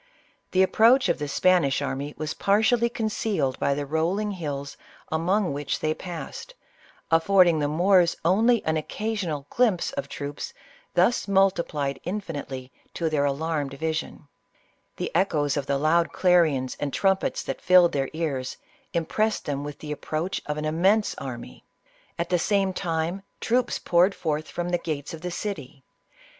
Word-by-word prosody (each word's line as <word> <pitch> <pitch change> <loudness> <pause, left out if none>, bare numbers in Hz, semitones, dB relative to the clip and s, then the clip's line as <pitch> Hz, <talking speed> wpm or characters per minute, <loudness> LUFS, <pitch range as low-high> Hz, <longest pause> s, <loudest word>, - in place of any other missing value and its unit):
The 190 0 +4
approach 235 +7 +4
of - - +1
the 145 - -3
Spanish 170 -2 +3
army 140 +2 -4
was 155 0 -3
partially 225 +4 +2
concealed 210 - -1
by 140 - +1
the 145 0 -3
rolling 170 +8 0
hills 145 -6 -5 0.4
among 175 +2 +1
which 145 0 -2
they 155 0 0
pass 175 0 -7
ed, - - -16 0.6
affording 170 0 +5
the 145 - +1
Moors 175 +3 +3
only 225 +6 +3
an 160 0 +1
occasional 175 -4 -3
glimpse 225 -8 +2
of 280 0 -5
troops 145 0 -6 0.4
thus 245 - +3
multiplied 170 -8 +1
infinitely 145 -9 -5 0.2
to 165 -2 -1
their 145 -2 +2
alarmed 145 -1 -1
vision; 160 0 -4 0.7
the - - -3
echoes 155 -6 +2
of 145 -2 -2
the 140 - +1
loud 165 +4 +2
clarions 160 -8 +2
and 145 -1 -2
trumpets 190 +3 +1
that - - -5
filled 180 -1 +6
their 135 -2 -1
ears, 140 -6 -3 0.4
impressed 210 +6 0
them 145 -1 -2
with 145 -1 -6
the 150 0 -7
approach 155 +4 -3
of 150 0 -2
an 150 - -3
im 155 +2 -2
mense 205 +3 +3
army. 120 - -8 0.5
At 170 - -2
the 180 -1 +2
same 195 0 +1
time 170 +1 -2 0.2
troops 245 +1 +1
poured 180 +3 +3
forth* 155 -1 -2
from 175 0 -4
the 175 0 +1
gates 155 -1 -4
of 160 - -8
the 180 - -3
city. 160 -8 -6
165 Hz, 155 wpm, -25 LUFS, 145-190 Hz, 0.7 s, filled